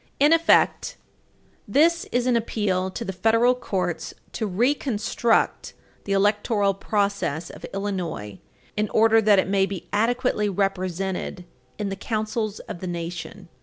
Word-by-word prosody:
In 295 +3 +6
effect, 330 0 +3 0.7
this 335 +4 +3
is 245 0 +1
an 250 -1 +3
appeal 205 -5 0
to 230 +5 -6
the 190 - -4
federal 230 +5 +3
courts 185 -8 -3 0.2
to 220 - -3
reconstruct 230 +1 0 0.3
the 200 - -4
electoral 205 0 +2
process 200 -6 -1
of - - -9
Illinois 180 - -4 0.4
in 210 -1 0
order 225 0 +4
that 210 -1 +5
it 190 - +2
may 195 0 +2
be 195 -3 -7
adequately 230 0 +1
represented 190 -1 -2 0.3
in 205 - -2
the 195 - -3
councils 215 0 -2
of - - -8
the 185 - -5
Nation. 175 +2 -6
205 Hz, 135 wpm, -24 LUFS, 190-225 Hz, 0.7 s, In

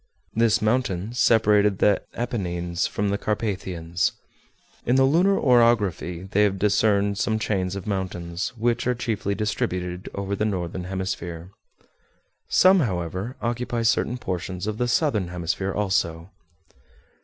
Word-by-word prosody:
This 115 -2 +2
mountain 110 -3 0
separated 105 -4 +4
the 100 0 +3
Apennines 90 -7 -2
from 105 0 -1
the 100 0 -1
Carpathians. 95 -5 -1 0.7
In 120 - +2
the 135 - +5
lunar 175 +8 +4
orography 115 - +2
they 105 - +3
have 100 -2 +2
discerned 100 0 +2
some 110 - +1
chains 95 -3 -1
of 100 - -6
mountains, 90 -3 -3
which 120 +2 0
are 125 - +2
chiefly 110 -4 -2
distributed 90 -5 -2
over 100 0 -2
the 105 - -1
northern 90 -3 -2
hemisphere. 90 -2 -4 1.0
Some, 190 +1 +6
however, 95 - -2
occupy 120 0 -1
certain 115 +2 +1
portions 90 -3 -4
of 110 0 -3
the 125 - +1
southern 120 - +1
hemisphere 90 +2 -2
also. 95 -3 -1
100 Hz, 130 wpm, -24 LUFS, 90-115 Hz, 1.0 s, Some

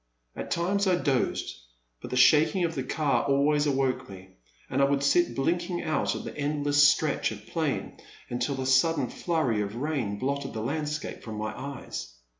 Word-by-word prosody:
At - - -6
times 195 +4 +1
I 185 - +4
dozed, 140 -7 0 0.5
but - - -7
the 125 - -2
shaking 155 +7 +5
of 165 -1 0
the 135 - -2
car 145 +2 0
always 145 +2 +2
awoke 135 -4 0
me, 95 -1 -11 0.4
and 135 +2 0
I - - +6
would 140 0 +1
sit 175 +5 +3
blinking 175 +5 -1
out 155 -3 0
at - - -5
the - - -7
endless 145 0 +1
stretch 150 -3 +1
of 105 -1 -9
plain, 160 -5 -2 0.3
until 125 +3 -2
a 130 - -2
sudden 135 0 +3
flurry 145 -11 0
of 105 +1 -4
rain 130 -7 -2
blotted 140 +4 -2
the 110 - -4
landscape 150 +4 -3
from 110 -2 -7
my 110 0 -4
eyes. 135 - -7
140 Hz, 180 wpm, -27 LUFS, 130-155 Hz, 0.5 s, I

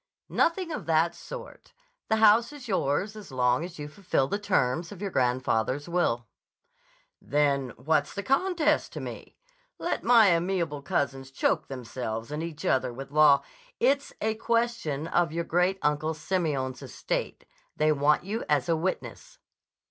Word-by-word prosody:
"Nothing 335 0 +1
of 305 - -5
that 165 +1 +3
sort. - - -10 0.4
The 220 - +4
house 220 +3 +5
is 285 -4 -10
yours 190 +1 0
as 210 -8 -10
long 125 +2 +2
as 175 0 -8
you 150 -1 -6
fulfill 150 -4 -1
the 200 - -2
terms 170 -5 0
of 200 - -9
your 200 -1 -3
grandfather's 130 +1 0
will." 170 -9 0 1.0
"Then 140 -3 +1
what's 145 +2 0
the 200 - -3
contest 320 - +1
to - - -5
me? - - -8 0.4
Let - - -2
my 230 -4 +6
amiable 170 -4 0
cousins 135 -1 -2
choke 135 - 0
themselves 120 -2 -5
and 150 +1 -3
each 165 -2 -6
other 130 -1 +1
with 135 +3 -8
law—" 150 -1 +6 0.4
"It's 280 +1 +2
a 220 +1 +1
question 230 -10 -1
of 170 -1 +1
your 170 +1 -2
Great 180 +3 +1
Uncle 150 +2 0
Simeon's 155 -6 -2
estate. - - -4 0.3
They 155 0 +3
want 150 +1 +3
you 210 +5 -3
as 150 +1 +2
a 165 - +2
witness." 180 +4 -4
160 Hz, 155 wpm, -27 LUFS, 140-200 Hz, 1.0 s, my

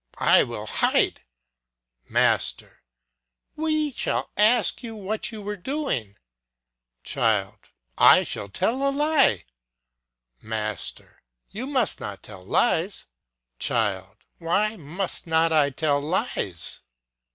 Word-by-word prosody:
I - - +5
will - - -4
hide. - - +2 0.9
Master. - - 0 0.7
We 310 -1 0
shall - - -2
ask 215 -1 +3
you 230 -2 -7
what 210 +2 -3
you 215 -2 -8
were 210 +1 -4
doing. 200 - -3 0.9
Child. 110 -7 -1 0.3
I - - +7
shall 100 - -4
tell 225 - -1
a 275 - +3
lie. 280 - +3 1.0
Master. 110 -1 -5 0.3
You 235 +7 -5
must 260 -6 0
not 100 -2 -7
tell 100 -3 -11
lies. 165 - 0 0.5
Child. 95 0 -1 0.2
Why 200 +6 0
must 175 +2 -4
not 160 0 +2
I 150 -2 +4
tell 145 0 0
lies? 150 - -1
180 Hz, 105 wpm, -24 LUFS, -, 1.0 s, I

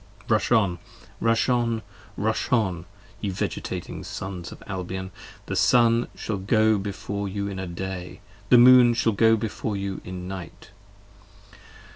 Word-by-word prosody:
50 - - -1
Rush - - +1
on! 100 -7 +3 0.4
Rush 115 0 +2
on! 120 -2 +1 0.4
Rush 110 +2 -1
on! 95 -8 +1 0.3
ye 105 - -2
vegetating 95 - -4
Sons 95 -3 -6
of - - -12
Albion! 95 0 -5 0.3
The - - -4
Sun 120 -1 +4
shall 110 - -3
go 110 +2 +3
before 100 0 -4
you 100 +1 -3
in 95 -3 -5
Day: 95 +1 -6 0.3
the 125 - +8
Moon 120 -1 +8
shall 115 -1 +2
go 115 +2 +5
Before 105 -1 -3
you 100 -1 -4
in 90 0 -7
Night. 95 0 -9
100 Hz, 140 wpm, -25 LUFS, 95-115 Hz, 0.4 s, the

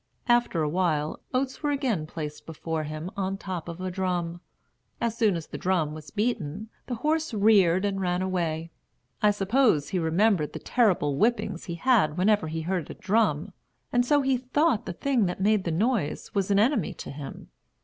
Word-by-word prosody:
After 240 -9 +3
a - - +1
while, 155 -2 0
oats 260 +1 -1
were 295 - 0
again 255 - 0
placed 150 -2 -7
before 160 0 -3
him 155 +4 -5
on 195 -1 -1
the - - -4
top 185 -4 -5
of 170 +1 -7
a 185 0 -3
drum. 175 -2 -2 0.6
As 230 -1 -1
soon 220 -5 +2
as 165 -2 -4
the - - -8
drum 175 -5 0
was 155 -1 -9
beaten, 210 -3 -2 0.2
the 245 - -2
horse 315 -4 +1
reared 200 -3 +4
and 195 -1 -1
ran 180 0 0
away. 165 -3 -2 0.5
I 210 - +5
suppose 205 - +2
he 185 - 0
remembered 170 0 +2
the - - -4
terrible 185 - +2
whippings 220 -4 0
he 170 - -4
had 235 -3 +4
had 150 - -10
whenever 200 -2 +3
he 160 +1 -3
heard 175 -1 -2
a - - -7
drum, 195 -6 +1 0.4
and 245 0 +4
so 290 +3 +3
he 265 -1 +2
thought 255 -1 +1
the 180 - -3
thing 245 0 +1
that 180 - -4
made 205 0 +2
the 170 - 0
noise 210 - -1
was 195 -1 0
an 200 - +3
enemy 220 - +2
to - - -7
him. 140 0 -8
190 Hz, 195 wpm, -27 LUFS, 165-225 Hz, 0.6 s, I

